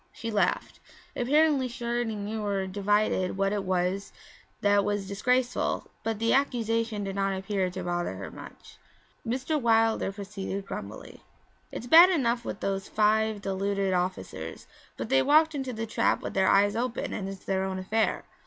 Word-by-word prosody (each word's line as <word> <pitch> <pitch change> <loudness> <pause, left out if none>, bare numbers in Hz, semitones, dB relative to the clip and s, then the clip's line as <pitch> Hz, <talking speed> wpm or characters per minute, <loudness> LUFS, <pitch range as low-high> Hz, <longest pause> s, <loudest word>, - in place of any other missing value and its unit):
She 230 0 -6
laughed. 200 -4 0 0.4
Apparently 285 +1 +3
she 240 0 -7
already 235 -2 -1
knew 210 +1 -4
or 200 -2 -1
divined 200 -1 0
what 195 +1 +1
it 205 -2 -1
was 185 +1 -1 0.5
that 205 0 +4
was 205 -1 -2
disgraceful, 250 +5 0
but 225 -1 -1
the 230 +2 +1
accusation 230 -5 0
did 195 -1 -4
not 195 -1 0
appear 190 -1 -1
to 185 +1 -6
bother 175 - -2
her 95 +1 -7
much. - - -13 0.4
Mr. 265 +6 -1
Wilder 225 -3 +2
proceeded 200 -1 -5
grumblingly. - - -8 0.5
'It's - - -6
bad 335 +8 +9
enough 245 -9 +1
with - - -6
those 195 -1 -2
five 215 0 +1
deluded 195 0 -1
officers, 180 - -3 0.3
but - - -5
they 135 - +4
walked 315 - +4
into 265 -3 -3
the 225 -1 -4
trap 220 - 0
with - - -4
their 190 0 +2
eyes 205 +1 +4
open 240 +1 -2
and 195 -1 -4
it's 195 -1 -9
their 190 0 0
own 190 0 -3
affair. 215 +4 0
205 Hz, 165 wpm, -28 LUFS, 195-235 Hz, 0.5 s, bad